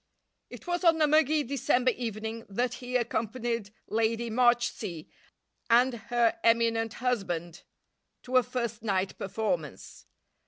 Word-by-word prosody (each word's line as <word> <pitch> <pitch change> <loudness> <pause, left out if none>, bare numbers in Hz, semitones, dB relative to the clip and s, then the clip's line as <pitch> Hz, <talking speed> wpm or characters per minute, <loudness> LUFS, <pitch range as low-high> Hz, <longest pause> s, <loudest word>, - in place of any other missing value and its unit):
It - - -11
was 350 0 -2
on 330 -2 +5
a 310 - +5
muggy 305 0 +3
December 255 -1 +1
evening 225 -1 -5
that 240 +5 -1
he 250 0 -5
accompanied 235 -2 -1 0.2
Lady 230 +1 0
Marchsea 235 -8 +1 0.6
and 245 +2 +5 0.2
her 240 +6 +2
eminent 230 -1 +2
husband 175 -9 -2 0.6
to 255 +1 +1
a - - +7
first 235 -3 -4
night 195 -3 -1
performance. 185 - -4
235 Hz, 120 wpm, -29 LUFS, 220-250 Hz, 0.6 s, a